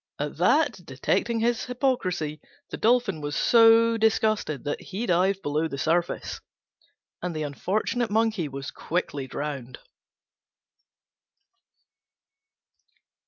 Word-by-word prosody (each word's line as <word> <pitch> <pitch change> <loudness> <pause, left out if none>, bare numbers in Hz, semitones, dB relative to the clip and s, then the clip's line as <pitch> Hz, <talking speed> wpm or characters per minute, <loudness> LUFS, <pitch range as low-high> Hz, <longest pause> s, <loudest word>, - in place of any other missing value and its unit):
At - - -4
that, - - +2
detecting 230 -1 -1
his 235 0 +1
hypocrisy, 185 - -1 0.3
the - - -4
Dolphin 225 -8 +2
was 145 0 -4
so 230 0 +5
disgusted 215 - +1
that 145 - -3
he 200 +5 -5
dived 190 +1 +1
below 150 +2 0
the 140 - -6
surface, 170 +4 -1 0.8
and 180 -2 -3
the 155 - -2
unfortunate 215 - -1
Monkey 215 -5 +1
was 135 -1 -6
quickly 145 -5 -3
drowned. 135 -3 -5
185 Hz, 105 wpm, -26 LUFS, 150-225 Hz, 0.8 s, so